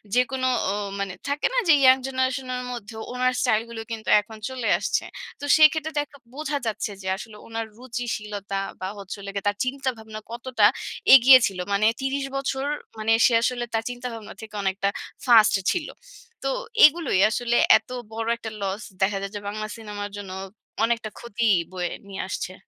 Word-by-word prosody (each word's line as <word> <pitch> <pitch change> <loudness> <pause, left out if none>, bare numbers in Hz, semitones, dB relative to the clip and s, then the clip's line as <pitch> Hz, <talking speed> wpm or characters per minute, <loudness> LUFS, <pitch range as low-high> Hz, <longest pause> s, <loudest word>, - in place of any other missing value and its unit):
যেকোনো 255 +1 +1 0.2
অ - - -1 0.3
মানে 195 -2 -3
থাকে 285 +1 +1
না - - -1
যে 315 - +8
ইয়ং 260 0 +7
জেনারেশন 260 0 -1
এর 250 - -4
মধ্যে 225 -1 -8 0.2
ওনার 255 0 +1
স্টাইল 220 0 +3
গুলো 225 -1 -6
কিন্তু 220 -1 -5
এখন 220 +1 -12
চলে 255 -3 -4
আসছে। - - 0 0.4
তো 285 - -5
সেই 310 -1 +9
ক্ষেত্রে 315 0 -4
দেখ 290 - -3 0.2
বোঝা 300 0 -2
যাচ্ছে 215 -1 -2
যে 190 - -7
আসলে 210 0 -10
উনার 225 0 -4
রুচিশীলতা 210 -5 -4 0.2
বা 185 - -2
হচ্ছে 195 0 -7
হলো 200 0 -7
গিয়ে 200 - -3
তার 205 - -4
চিন্তাভাবনা 245 -5 -4
কতটা 235 -3 +1 0.5
এগিয়ে 260 0 +10
ছিল। 190 -2 -6
মানে 205 +2 +2
৩০ 270 +1 -1
বছর 270 0 -2 0.3
মানে 215 +1 0
সে 240 - +4
আসলে 245 0 0
তার 225 0 0
চিন্তাভাবনা 245 -3 -7
থেকে 215 -1 -10
অনেকটা 195 +1 0 0.4
ফাস্ট 225 -4 +6 0.2
ছিল। 340 -4 -2 0.6
তো - - 0 0.4
এগুলোই 305 - +3
আসলে 240 +1 0 0.2
এত 220 - -13 0.2
বড় 225 0 -4
একটা 225 -1 -7
লস 195 +2 -2 0.2
দেখা 195 +1 +2
যায় 195 0 -5
যে - - -3
বাংলা 215 +1 -4
সিনেমার 205 -2 -6
জন্য 195 -2 -7 0.5
অনেকটা 230 -1 0
ক্ষতি 235 0 -3 0.3
বয়ে 180 -2 -3 0.2
নিয়ে 195 - -5
আসছে। 185 0 -4
225 Hz, 175 wpm, -24 LUFS, 205-260 Hz, 0.6 s, এগিয়ে